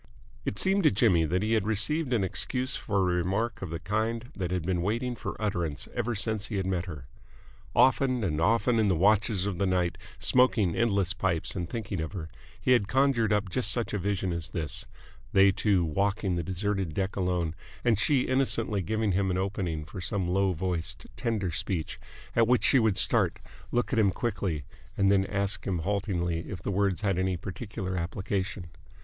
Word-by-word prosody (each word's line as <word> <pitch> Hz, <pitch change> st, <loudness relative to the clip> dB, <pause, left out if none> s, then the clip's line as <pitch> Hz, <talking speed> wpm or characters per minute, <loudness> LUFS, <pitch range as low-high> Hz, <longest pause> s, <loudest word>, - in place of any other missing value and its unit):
It 105 Hz, -, -2 dB
seemed 195 Hz, -, +2 dB
to 160 Hz, -, +5 dB
Jimmy 95 Hz, -6 st, +3 dB
that 90 Hz, +5 st, 0 dB
he 110 Hz, +1 st, +1 dB
had 110 Hz, -2 st, +1 dB
received 130 Hz, +7 st, 0 dB
an 115 Hz, -5 st, +2 dB
excuse 125 Hz, +7 st, -2 dB
for 100 Hz, -, -2 dB
a 90 Hz, -1 st, +1 dB
remark 100 Hz, +7 st, -1 dB
of 90 Hz, -4 st, -5 dB
a 85 Hz, -, -2 dB
kind 110 Hz, -, -2 dB
that 90 Hz, -3 st, -3 dB
had 90 Hz, -2 st, -1 dB
been 90 Hz, -1 st, 0 dB
waiting 120 Hz, +6 st, -1 dB
for -, -, -6 dB
utterance 85 Hz, -9 st, -2 dB
ever 120 Hz, -1 st, -1 dB
since 110 Hz, 0 st, 0 dB
he 110 Hz, -, -4 dB
had 95 Hz, -1 st, -1 dB
met 95 Hz, -2 st, -1 dB
her. 75 Hz, -6 st, -7 dB, 0.7 s
Often 130 Hz, -1 st, +3 dB
and 80 Hz, -5 st, -1 dB
often 115 Hz, +5 st, +3 dB
in 110 Hz, -, +3 dB
the 95 Hz, -, +3 dB
watches 100 Hz, +2 st, +3 dB
of 100 Hz, -4 st, -3 dB
the 100 Hz, -, +2 dB
night, 90 Hz, -2 st, 0 dB, 0.2 s
smoking 120 Hz, -8 st, +3 dB
endless 100 Hz, -5 st, +2 dB
pipes 95 Hz, -4 st, -1 dB
and 90 Hz, -2 st, -3 dB
thinking 105 Hz, -6 st, -3 dB
of 80 Hz, +4 st, -5 dB
her, 80 Hz, -5 st, -6 dB, 0.3 s
he 125 Hz, -, +1 dB
had 115 Hz, -6 st, +4 dB
conjured 130 Hz, -3 st, +2 dB
up 105 Hz, -2 st, +1 dB
just 125 Hz, -2 st, +2 dB
such 115 Hz, 0 st, 0 dB
a 105 Hz, -, 0 dB
vision 95 Hz, -1 st, -1 dB
as 85 Hz, -2 st, -4 dB
this 80 Hz, -4 st, -3 dB, 0.5 s
they 95 Hz, 0 st, +6 dB
two 95 Hz, -3 st, +2 dB
walking 100 Hz, +3 st, 0 dB
the 85 Hz, -, -1 dB
deserted 95 Hz, -2 st, -2 dB
deck 95 Hz, 0 st, -1 dB
alone, 90 Hz, -4 st, 0 dB, 0.3 s
and 115 Hz, -4 st, +3 dB
she 135 Hz, +4 st, +3 dB
innocently 125 Hz, -6 st, +1 dB
giving 110 Hz, +3 st, 0 dB
him 95 Hz, +1 st, +1 dB
an 90 Hz, -, 0 dB
opening 95 Hz, -5 st, -2 dB
for 90 Hz, +4 st, -8 dB
some 95 Hz, 0 st, -1 dB
low 95 Hz, +2 st, +2 dB
voiced, 90 Hz, -1 st, -2 dB
tender 110 Hz, -6 st, -1 dB
speech, 85 Hz, 0 st, -2 dB, 0.4 s
at 115 Hz, -1 st, +4 dB
which 125 Hz, 0 st, +3 dB
she 135 Hz, -, +5 dB
would 110 Hz, -4 st, +2 dB
start, -, -, +3 dB, 0.3 s
look 120 Hz, +2 st, 0 dB
at 115 Hz, -, +3 dB
him 105 Hz, -3 st, +4 dB
quickly, 95 Hz, -8 st, -2 dB, 0.3 s
and 100 Hz, 0 st, +4 dB
then 95 Hz, -1 st, +3 dB
ask 100 Hz, 0 st, -1 dB
him 95 Hz, -2 st, 0 dB
haltingly 90 Hz, -2 st, -1 dB
if 95 Hz, -, -5 dB
the 95 Hz, -, -3 dB
words 100 Hz, -1 st, +1 dB
had 100 Hz, -3 st, +1 dB
any 95 Hz, -1 st, 0 dB
particular 95 Hz, +2 st, -5 dB
application. 95 Hz, 0 st, -3 dB
100 Hz, 195 wpm, -28 LUFS, 90-110 Hz, 0.7 s, they